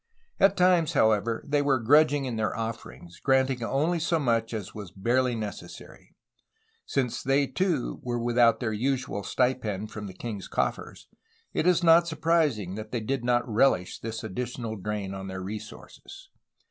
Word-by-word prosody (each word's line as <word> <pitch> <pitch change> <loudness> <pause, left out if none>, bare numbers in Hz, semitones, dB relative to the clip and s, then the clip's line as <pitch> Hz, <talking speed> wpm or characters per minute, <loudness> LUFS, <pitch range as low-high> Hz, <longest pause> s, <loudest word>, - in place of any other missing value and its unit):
At 195 0 +4
times, 180 -3 +3
however, 110 -3 +2
they 145 0 +2
were 140 -2 +2
grudging 145 +3 +4
in 125 -3 -3
their 110 -1 -1
offerings, 110 -6 -7
granting 130 -2 +2
only 155 +8 0
so 165 +1 +1
much 115 -6 0
as 105 -5 -5
was 105 -4 -8
barely 120 +6 0
necessary. 105 -2 -8 0.7
Since 130 -4 -1
they 135 +2 +2
too 155 - -1
were 120 -1 -2
with 120 0 -2
out 115 -1 +5
their 110 -4 -2
usual 125 -3 -1
stipend 110 -4 -1
from 105 -1 -6
the 95 - -10
king's 105 -2 -6
coffers, - - -3 0.5
it 170 - 0
is 175 -1 +3
not 170 +1 +6
sur 160 - -4
prising 150 - +1
that 110 +1 -7
they 120 - -1
did 130 +3 -2
not 120 0 +2
rehsh 110 -5 +1
this 115 0 -5
additional 115 +1 -4
drain 100 -1 -4
on 95 0 -6
their 95 0 -5
resources. 110 - -9
120 Hz, 165 wpm, -27 LUFS, 110-140 Hz, 0.7 s, not